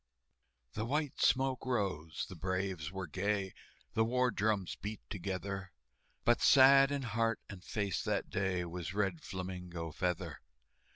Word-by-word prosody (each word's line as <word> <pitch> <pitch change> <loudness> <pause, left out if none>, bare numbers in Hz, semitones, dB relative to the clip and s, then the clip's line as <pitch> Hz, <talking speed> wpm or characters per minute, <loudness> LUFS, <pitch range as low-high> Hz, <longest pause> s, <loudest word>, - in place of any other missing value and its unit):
The 110 +2 -2
white 150 +1 -1
smoke 130 -1 +3
rose, 95 - -1
the 95 - -9
braves 95 -2 -2
were 95 -1 -4
gay, 95 +3 -1 0.4
The 110 - +3
war 125 +2 +2
drums 105 -3 0
beat 105 +1 -5
together, 95 0 -4 0.5
But 120 - +4
sad 135 0 +8
in 140 -1 -1
heart 115 -1 0
and 95 -3 -9
face 100 0 -1
that - - 0
day 95 -2 0
Was 90 +1 -5
Red 95 -5 0
Flamingo 90 -3 -5
Feather. 90 +1 -2
100 Hz, 135 wpm, -34 LUFS, 90-115 Hz, 0.5 s, sad